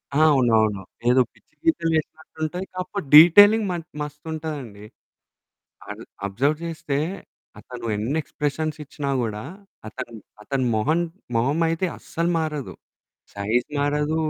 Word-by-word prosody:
ఆ! - - +2
అవునవును. 110 -6 +3 0.3
ఏదో 130 +1 +5
పిచ్చి - - -29
గీతలు 170 - +2
చేసినట్టుంటాయి 160 +3 -4
కాకపోతే 185 0 -4
డీటెయిలింగ్ 205 +7 +9
మ - - -1 0.3
మస్తుంటదండి. 150 -7 -6 1.0
అబ్ - - -7 0.2
అబ్జర్వ్ 135 +10 0
చేస్తే 155 -4 -3 0.6
అతను 125 -2 -9
ఎన్ని 120 +9 -1
ఎక్స్‌ప్రెషన్స్ 150 +1 -3
ఇచ్చినా 145 -1 -5
కూడా 105 -2 -3 0.5
అతను 125 +1 -7 0.3
అతని 130 +3 -1
మొహం, 150 +10 +1 0.4
మొహం 135 +8 +1
అయితే 165 +3 0
అస్సలు 170 +1 -2
మారదు. 150 -4 -3 0.6
సైజ్ 110 +5 0
మారదు 150 +2 0
150 Hz, 115 wpm, -23 LUFS, 125-160 Hz, 1.0 s, డీటెయిలింగ్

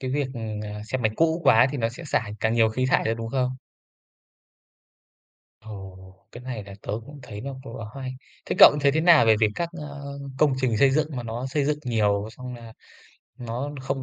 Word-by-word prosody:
Cái 130 - -3
việc, 140 +1 0
ờ, 120 - -5 0.3
ờ, 105 - -7
xe 130 +4 -2
máy 110 -3 +1
cũ 165 +1 +2
quá 120 +2 +6
thì 145 - -4
nó 115 -1 +1
sẽ 125 +9 -10
xả 120 -8 -1
càng 110 +1 +1
nhiều 115 -1 +4
khí 130 +4 -1
thải - - +2
ra, 110 - +1
đúng 115 0 -5
không? 130 0 -1 2.0
Ồ! 95 -3 -11
Cái 120 - -10
này 125 -5 -5
là 100 -1 -10
tớ - - -4
cũng 145 0 -11
thấy 105 -4 -8
nó 135 +4 -5
cũng 115 -2 -9
là 115 - -6
khá 135 - -7
hay. 130 -1 -5 0.3
Thế - - -2
cậu - - +10
thấy 140 0 +4
thế 160 - +2
nào 165 -7 +6
về 110 -1 +6
việc 110 - +5
các, 170 -1 -2
ơ, 140 -1 -7 0.2
công 150 -2 +4
trình 125 -4 +1
xây 135 +5 +5
dựng 150 +2 +1
mà 125 - -3
nó 120 +2 -4
xây 140 +2 0
dựng 150 +1 0
nhiều 105 -3 +1
xong 125 +2 -8
nà 115 -2 -11 0.7
nó 125 +4 -4
không 135 0 -3
125 Hz, 225 wpm, -25 LUFS, 110-140 Hz, 2.0 s, cậu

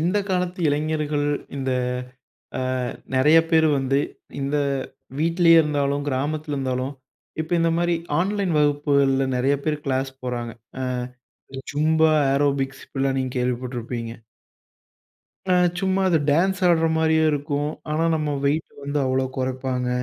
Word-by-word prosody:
இந்த 180 +6 +1
காலத்து 180 0 -1
இளைஞர்கள். 150 0 0 0.3
இந்த 135 -1 -2 0.9
அ, - - -1 0.5
நெறைய 150 +5 +6
பேரு 160 -1 +5
வந்து, 135 +1 +1 0.4
இந்த, 140 +2 -1 0.6
வீட்டிலே 165 +2 +4
இருந்தாலும், 145 -2 0
கிராமத்தில 145 +3 -2
இருந்தாலும், 130 0 -2 0.5
இப்ப 160 - -11
இந்த 165 0 +3
மாரி 175 0 +2 0.2
ஆன்லைன் 195 0 0
வகுப்புகள்ல 140 -2 +2
நெறைய 135 +3 +2
பேரு 150 -1 0
கிளாஸ் 135 0 -1
போறாங்க. 120 -2 -3 0.3
ஆ, - - -2 0.7
இந்த 135 0 -6
ஜும்பா, 160 +2 +3 0.2
ஏரோபிக்ஸ் 140 -1 0
இப்டியெல்லாம் 135 -1 -1
நீங்க 130 -1 -2
கேள்விப்பட்டிருப்பீங்க. 120 -2 -3 1.4
அ - - +5 0.3
சும்மா 190 0 +1
அது 170 -3 +3
டான்ஸ் 185 +7 +2
ஆடற 165 -2 +4
மாரியே 160 0 +3
இருக்கும், 145 0 -1 0.2
ஆனா, 160 +2 +1
நம்ம 150 -2 -1
வெயிட்டு 150 +3 0
வந்து 145 +1 -2
அவ்ளோ 130 0 +1
கொறப்பாங்க. 130 -1 -2
145 Hz, 125 wpm, -23 LUFS, 135-160 Hz, 1.4 s, நெறைய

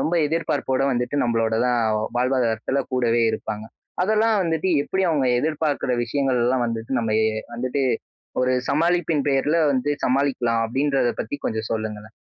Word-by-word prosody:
ரொம்ப 170 - 0
எதிர்பார்ப்போட 145 -4 -1
வந்துட்டு 125 +3 -1
நம்மளோட 115 -2 +1
தான் 120 -1 +2 0.4
வாழ்வாதாரத்தில 125 0 0
கூடவே 120 -2 +2
இருப்பாங்க. 110 0 -5 0.4
அதெல்லாம் 220 +2 +2
வந்துட்டு 165 +1 0
எப்படி 190 +6 -1
அவங்க 145 -5 +1
எதிர்பார்க்குற 150 -3 -1
விஷயங்கள்லாம் 125 -1 +1
வந்துட்டு 115 +1 -4
நம்ம 115 -2 -1
ஏ - - +3 0.3
வந்துட்டு, 130 +3 -2 0.6
ஒரு 130 0 +2 0.2
சமாளிப்பின் 165 0 +1
பேர்ல 145 +4 +2
வந்து 130 +2 0
சமாளிக்கலாம் 125 -4 +1
அப்படின்றத 135 +1 +1
பத்தி - - -4
கொஞ்சம் 110 0 -3
சொல்லுங்களேன்? 110 -1 -4
130 Hz, 130 wpm, -23 LUFS, 115-145 Hz, 0.6 s, ஏ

